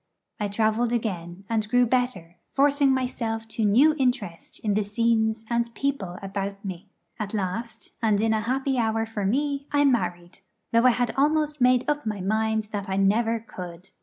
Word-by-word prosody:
I 210 - 0
travelled 220 +3 +1
again, 195 -5 -3
and 215 -2 -1
grew 245 +2 +4
better, 235 -9 -1 0.2
forcing 280 0 +4
myself 230 -4 -2
to 220 0 -2
new 250 +10 +5
interest 245 -10 -2
in 210 -2 0
the 210 +1 +1
scenes 220 +1 +1
and 235 0 0
people 225 -11 -2
about 200 +1 -4
me. 190 +1 -6 0.3
At 215 0 -3
last, 215 +4 -4
and 215 -3 +2
in 220 +1 +2
a 220 - +1
happy 265 +3 0
hour 225 -1 +1
for 210 -3 -3
me, 280 +4 -1
I 290 0 +3
married; 175 -9 0 0.3
though 230 +1 +4
I - - +8
had 245 -1 0
almost 300 0 +1
made 250 0 +4
up 295 -5 -1
my 210 -2 -2
mind 220 +2 0
that 200 -1 -4
I 190 - -1
never 225 +4 +2
could. 180 -3 -9
225 Hz, 175 wpm, -25 LUFS, 200-250 Hz, 0.3 s, I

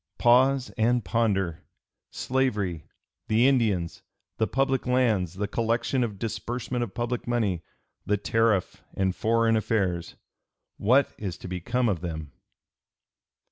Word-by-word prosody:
Pause 130 +2 +4
and 120 0 +2
ponder! 95 -8 0 0.5
Slavery, 105 - -1 0.4
the 115 +4 +4
Indians, 105 -11 +1 0.4
the 110 - +1
public 135 -1 0
lands, 110 -9 +2
the 100 +2 -2
collection 115 +4 0
and 105 -4 -3
disbursement 120 +3 -3
of 110 -3 -7
public 120 0 -2
money, 110 -8 0 0.4
the 105 - +1
tariff, 110 -1 +1
and 95 -1 0
foreign 115 0 +2
affairs: 95 -6 -1 0.6
what 130 +6 +3
is 95 -4 -4
to - - -9
become 120 +8 -1
of 95 -7 0
them?" 80 -4 -5
115 Hz, 120 wpm, -26 LUFS, 95-120 Hz, 0.6 s, Pause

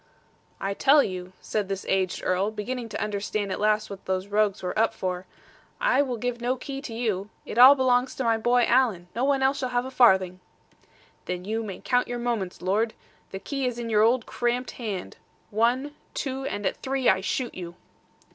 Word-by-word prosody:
'I 195 +1 -2
tell 280 +7 +5
you,' 185 -1 -5
said 210 -3 -2
this 195 -1 -3
aged 190 -1 0
Earl, 185 +3 +1
beginning 230 +3 -5
to - - -5
understand 205 -1 -2
at - - -3
last 215 +1 +2
what 200 -1 -9
these 190 +1 -1
rogues 205 -1 +1
were 180 - -2
up 225 0 +2
for; 185 -2 -3 0.5
'I - - +3
will 255 -4 -2
give 240 +1 -3
no 245 +2 +1
key 270 +1 -6
to 280 - -7
you. 210 -4 -2 0.2
It 235 - -3
all 260 +3 +10
belongs 255 -1 +2
to 265 - -2
my 230 -1 +3
boy, 240 +2 +3
Alan. 230 -9 +2
No 240 - 0
one 275 -1 +2
else 270 +1 +2
shall 255 - -2
have 245 0 0
a 260 - -6
farthing.' 190 -8 +4 0.9
'Then 180 0 -4
you 220 +2 -1
may 195 -4 -7
count 245 -1 +1
your 245 - -3
moments, 230 -8 -3
lord. 215 +5 +1 0.3
The 195 - -6
key 275 +5 -3
is 245 -1 -3
in 235 -1 -4
your 210 -1 +4
old 235 +2 +3
cramped 245 +1 -1
hand. 210 -7 -5 0.3
One, 245 +7 +1 0.2
two, 270 -1 -3
and 205 -6 -3
at - - 0
three, 265 -1 -1
I 190 0 +4
shoot 245 +5 -2
you.' 175 -1 -7
225 Hz, 205 wpm, -26 LUFS, 195-250 Hz, 0.9 s, all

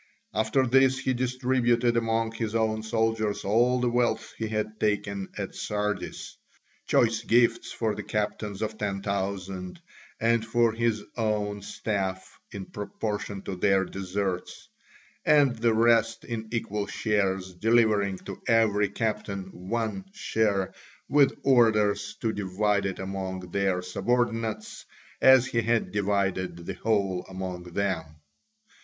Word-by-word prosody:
After 110 +5 +2
this 130 +1 +4
he 130 0 0
distributed 125 -1 +1
among 115 -1 +1
his 115 -1 -3
own 110 -1 +1
soldiers 110 -1 0
all 120 +5 +3
the 125 - +1
wealth 120 -2 0
he 110 - -3
had 110 0 -3
taken 105 -2 -1
at - - -4
Sardis, 105 -1 -3 0.5
choice 115 -1 +3
gifts 115 0 +3
for 110 -2 -1
the - - -5
captains 105 -1 -3
of 110 0 -4
ten 100 -2 -2
thousand 95 -2 -3 0.4
and 115 0 +2
for 115 0 +2
his 115 -2 0
own 105 -3 -1
staff 95 -2 -3
in 100 -2 -6
proportion 105 -1 -4
to 95 - -4
their 95 0 +3
deserts, 95 -1 -4 0.5
and 145 -4 +4
the 115 0 +2
rest 115 0 +3
in 110 -2 -4
equal 105 -3 -2
shares, 95 -3 0
delivering 105 -1 +2
to 100 0 -9
every 110 -3 +3
captain 100 -3 -3 0.2
one 115 - -2
share 105 - 0 0.4
with 145 -2 +4
orders 105 -5 +3
to 110 -2 0
divide 100 +1 0
it 95 - -4
among 95 -1 -5
their 95 -2 0
subordinates 115 +3 -1 0.4
as 130 -1 +7
he 115 -2 0
had 115 +1 +1
divided 95 -4 -1
the 95 - -4
whole 95 -2 0
among 95 -1 -5
them. 95 -1 -1
105 Hz, 130 wpm, -27 LUFS, 100-115 Hz, 0.5 s, as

